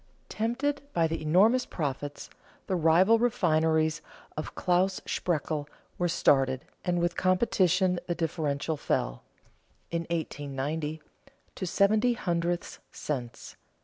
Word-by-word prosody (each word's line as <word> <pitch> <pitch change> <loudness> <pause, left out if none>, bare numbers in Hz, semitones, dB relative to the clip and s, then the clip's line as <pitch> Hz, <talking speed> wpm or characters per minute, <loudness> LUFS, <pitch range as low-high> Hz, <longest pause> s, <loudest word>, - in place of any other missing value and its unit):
Tempted 260 +6 -1
by 165 - +3
the 165 0 -2
enormous 205 +11 +4
profits, 145 -2 -4 0.4
the 190 - -1
rival 180 +7 +5
refineries 160 -9 +2 0.3
of 155 - -5
Claus 185 +1 +1
Spreckel 155 -3 -2 0.3
were 175 - +2
started, 135 -6 +2 0.2
and 175 -1 0
with 170 0 0
competition 185 -1 +2
the 175 - -1
differential 160 -2 -1
fell, - - -1 0.7
in 170 0 -2
1890, 150 -1 -3 0.5
to 185 - -4
seventy 210 +6 +3
hundredths 175 -5 -2
cents. 125 -6 -5
170 Hz, 110 wpm, -28 LUFS, 155-185 Hz, 0.7 s, rival